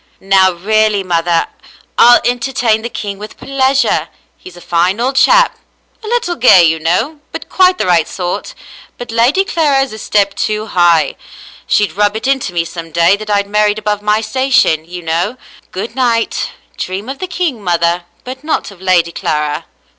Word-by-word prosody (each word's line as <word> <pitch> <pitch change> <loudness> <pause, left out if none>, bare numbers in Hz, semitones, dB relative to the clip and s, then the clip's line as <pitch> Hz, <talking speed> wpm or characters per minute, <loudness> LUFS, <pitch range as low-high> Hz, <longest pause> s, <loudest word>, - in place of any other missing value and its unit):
"Now 190 -1 +3
really, 215 +2 +1
mother; 170 -2 0 0.5
I'll 240 +1 +7
entertain 245 -2 0
the 235 - -5
king 200 -4 -6
with 210 +1 -10
pleasure. 265 - 0 0.3
He's 180 -1 -14
a - - -10
fine 175 +4 0
old 260 +3 -1
chap. - - +4 0.4
A - - -8
little 465 -6 -1
gay, 190 - +6
you 160 -1 +2
know, 180 - -1
but - - -8
quite 370 -1 +3
the - - -1
right 175 -3 +2
sort. 180 - -5 0.4
But 245 -1 -8
Lady 245 +12 +2
Clara 300 -7 +1
is 270 - -7
a 215 - -8
step 200 -2 +1
too 215 +1 -2
high. 175 -5 +2 0.5
She'd 205 -1 +1
rub 205 +1 +1
it 220 - -4
into 265 -7 0
me 170 -1 -1
some 165 -1 -8
day 170 +4 +3
that 215 +1 -9
I'd 200 -1 +1
married 210 0 +1
above 210 -1 -2
my 210 +1 +1
station, 225 - +1
you 175 +1 -8
know. 170 +9 -1 0.3
Good 200 +5 -6
night. 235 -3 0 0.3
Dream 190 +4 -5
of 270 +1 -6
the 370 - -4
king, 345 - -3
mother, 170 0 0 0.2
but 260 +2 -8
not 305 -8 -2
of 190 -2 -16
Lady 180 -3 +2
Clara." 150 -2 -2
210 Hz, 175 wpm, -14 LUFS, 175-255 Hz, 0.5 s, I'll